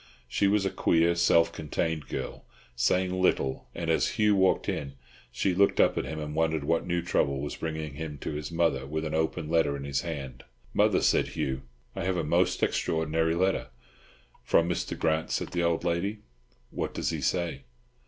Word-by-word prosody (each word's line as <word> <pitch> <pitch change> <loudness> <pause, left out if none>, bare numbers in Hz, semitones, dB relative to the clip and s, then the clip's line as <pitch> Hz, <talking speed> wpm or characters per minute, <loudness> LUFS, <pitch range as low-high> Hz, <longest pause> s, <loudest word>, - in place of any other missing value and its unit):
She 100 - +1
was 100 0 +2
a 95 - 0
queer, 85 +1 +3
self 85 -1 +4
contained 80 0 -2
girl, - - -5 0.3
saying 90 +9 +2
little; 70 -7 +1
and 85 -1 -4
as 120 +9 +1
Hugh 105 -2 +4
walked 95 -1 +2
in, 70 -2 -3 0.4
she 95 +9 0
looked 100 +2 +3
up - - +5
at - - -1
him, 80 - -5
and 75 0 -5
wondered 80 -1 +1
what 85 +4 0
new 85 -1 0
trouble 70 -5 +1
was 75 +1 -4
bringing 80 -2 -4
him 75 0 -6
to - - -3
his 75 +1 -5
mother 80 -6 +1
with 80 +2 -3
the 80 0 -2
open 80 0 -1
letter 80 -3 +2
in 70 - -7
his 70 -1 -1
hand. 70 -6 -6 0.3
"Mother," - - +3
said - - +3
Hugh, 65 -1 -3 0.3
"I - - -5
have 95 0 +1
had 85 - -1
a - - -5
most 90 +2 +2
extraordinary 80 +1 +1
letter." 95 -5 +1 0.8
"From 85 - +3
Mr. 90 - -2
Grant?" 80 -1 0
said - - -2
the 85 - -1
old 85 -1 +1
lady, 95 +5 -1 0.5
"What - - -3
does - - -1
he - - -3
say?" 85 -6 -1
80 Hz, 195 wpm, -28 LUFS, 75-85 Hz, 0.8 s, up